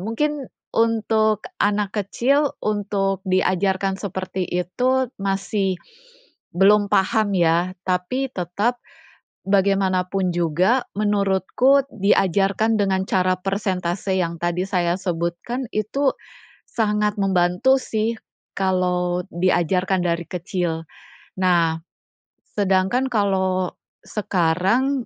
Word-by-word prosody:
Mungkin 275 +7 -2 0.2
untuk 220 -1 +1 0.2
anak 205 -1 +1
kecil 275 +8 +1
untuk 200 -2 -1
diajarkan 190 +1 +1
seperti 185 -2 -4
itu 250 +9 0
masih 195 0 -1 0.8
belum 205 +2 +5
paham 200 +1 +2
ya, 175 +2 +2
tapi 190 +9 -1
tetap 205 +7 -1 0.7
bagaimanapun 195 -2 +1
juga 175 - +2 0.2
menurutku 205 +6 +2
diajarkan 200 +1 +2
dengan 190 -2 +1
cara 185 -1 +1
persentase 190 -1 -2
yang 170 -2 -2
tadi 175 +1 0
saya 175 -2 0
sebutkan, 185 +7 -3
itu 265 +7 0 0.6
sangat 210 -2 0
membantu 190 +7 +3
sih 225 -2 -2 0.4
kalau 180 -2 0
diajarkan 185 +1 +1
dari 170 -1 -1
kecil. 170 -1 -3 0.6
Nah, 170 -3 +3 0.8
sedangkan 195 +5 +2
kalau 190 -4 +1 0.3
sekarang 210 +8 0
195 Hz, 90 wpm, -22 LUFS, 180-215 Hz, 0.8 s, belum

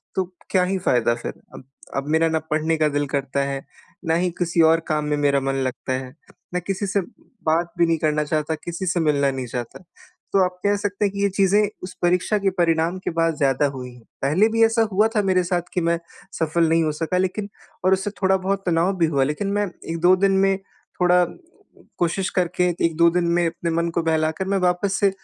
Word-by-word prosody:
तो 190 - +2 0.3
क्या 185 -2 +3
ही 190 +1 0
फायदा 120 -1 +3
फिर, 120 - -6 0.2
अब - - -10 0.3
अब 135 +1 -2
मेरा 160 +1 +3
ना 160 0 +1
पढ़ने 160 +1 +1
का 155 -1 +3
दिल 145 0 -1
करता 140 0 -1
है, 140 0 -4 0.4
ना 160 0 +2
ही 180 - 0
किसी 170 -1 +1
और 165 - +3
काम 150 -1 0
में 150 0 0
मेरा 140 -1 +2
मन 135 0 -1
लगता 130 +1 -4
है, 130 +1 -5 0.4
ना 180 - +1
किसी 195 +3 -3
से 200 +1 +1
बात 170 -5 -3
भी 170 - +6
नहीं 165 - +2
करना 150 -1 +1
चाहता, 155 +1 -1
किसी 170 +4 -6
से 175 -1 0
मिलना 140 -3 +2
नहीं 130 -1 -4
चाहता 120 +8 -6 0.5
तो 195 - +4
आप 180 0 -5
कह 205 0 +3
सकते 205 0 -1
हैं 195 - 0
कि 200 - -3
ये 200 - +4
चीजें 195 +1 +3 0.2
उस 180 - -6
परीक्षा 180 +4 +2
के 195 -1 +2
परिणाम 165 +1 +1
के - - -1
बाद 165 -1 +1
ज़्यादा 135 0 +2
हुईं 125 -1 -7
हैं। 125 - -16 0.2
पहले 160 +10 +3
भी 225 0 +3
ऐसा 225 0 +2
हुआ 210 +3 +4
था 210 - +4
मेरे 185 -2 +2
साथ 175 0 0
कि 180 - 0
मैं 170 0 +1 0.4
सफल 165 +1 +2
नहीं 165 0 +3
हो 155 - 0
सका 165 +3 -2
लेकिन 195 +3 -1 0.4
और 190 - +5
उससे 190 +2 -1
थोड़ा 190 0 +3
बहुत 195 +1 -2
तनाव 175 +3 +1
भी 170 - +3
हुआ 140 -4 +1
लेकिन 150 +8 -2
मैं 205 - +1 0.3
1-2 175 +3 +4
दिन 195 +1 +2
में 195 0 +2 0.4
थोड़ा 180 0 +5 0.8
कोशिश 180 +2 0
करके 180 0 +1 0.2
1-2 170 +1 +4
दिन 175 - 0
में 170 - +2
अपने 170 0 -3
मन 170 - -1
को - - -1
बहलाकर 160 +3 0
मैं - - +2
वापस 190 +2 0
से 200 - +5
170 Hz, 220 wpm, -22 LUFS, 155-190 Hz, 0.8 s, भी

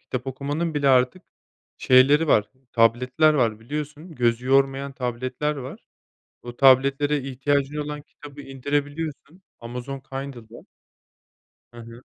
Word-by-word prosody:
Kitap 130 +1 -6
okumanın 145 +5 -3
bile 145 -1 +1
artık 130 +7 +3 0.6
şeyleri 140 +5 +5
var, 105 -4 +3 0.2
tabletler 125 +7 +3
var 115 -5 +1
biliyorsun, 150 +6 -6
gözü 120 0 0
yormayan 135 +1 +2
tabletler 130 +4 -3
var. 130 -1 -9 0.6
O 120 0 -9
tabletlere 140 +2 +4
ihtiyacın 140 +2 -1
olan 150 0 -4
kitabı 145 -1 -13
indirebiliyorsun, 145 +5 -4 0.2
Amazon 125 +3 -6
Kindle'da. 130 -4 -9 1.1
He 120 - -11
he. 115 +1 -12
135 Hz, 115 wpm, -24 LUFS, 125-145 Hz, 1.1 s, şeyleri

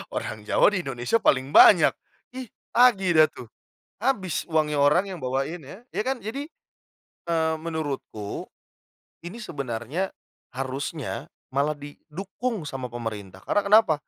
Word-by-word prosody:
Orang 110 -1 -4
Jawa 210 - +4
di 185 - 0
Indonesia 135 - -1
paling 130 +2 +2
banyak. 175 -6 +8 0.4
Ih, 255 -3 -7 0.2
tagih 200 -8 +5
dah 155 - +7
tuh. 120 - -11 0.5
Habis 205 - -1
uangnya 155 -2 +1
orang 150 +8 +4
yang 185 - -5
bawain 135 +4 -3
ya, 190 - -11
ya - - -2
kan 260 -3 -1
jadi, 265 +8 -4 0.9
eee, 160 -1 +2
menurutku, 145 -10 -5 0.7
ini 210 +7 -7
sebenarnya, 140 - -3 0.4
harusnya 135 +2 -4 0.2
malah 140 +3 +1
didukung 170 - -5
sama 125 -3 -6
pemerintah 105 -5 -6
karena 205 - +2
kenapa? 205 -5 +6
155 Hz, 130 wpm, -25 LUFS, 135-195 Hz, 0.9 s, banyak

